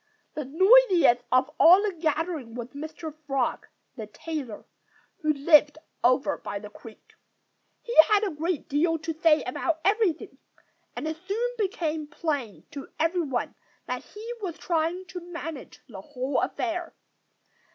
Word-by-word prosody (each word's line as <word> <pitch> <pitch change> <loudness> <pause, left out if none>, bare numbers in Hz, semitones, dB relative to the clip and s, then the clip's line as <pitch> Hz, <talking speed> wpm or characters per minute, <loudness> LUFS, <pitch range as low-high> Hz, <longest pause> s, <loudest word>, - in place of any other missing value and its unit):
The 300 - -4
noisiest 370 - +5
of 255 +3 +3
all 365 +5 +8
the 415 -2 -1
gathering 315 -6 -2
was 245 0 -6
Mr. 310 +2 -7
Frog, 270 -3 -1 0.3
the 220 -2 -7
tailor, 270 -1 -6 0.5
who 310 -6 +1
lived 295 0 +4 0.3
over 255 +4 +2
by 205 - -5
the 205 0 -10
creek. 220 0 -15 0.7
He 475 - -5
had 420 0 +4
a 405 - 0
great 320 +1 -3
deal 325 +4 +1
to 325 +1 -4
say 315 0 +3
about 320 +6 -2
everything; 395 -5 0 0.6
and - - -4
it 315 0 -3
soon 465 +5 -1
became 340 -8 -2
plain 290 - -4
to 280 -1 -8
everyone 325 -6 0 0.3
that - - -4
he 450 +3 -8
was 350 -5 -4
trying 340 +2 -1
to 370 -1 -7
manage 335 -4 -8
the 200 -6 -9
whole 260 +3 -2
affair. 345 -1 -3
315 Hz, 140 wpm, -26 LUFS, 275-355 Hz, 0.7 s, all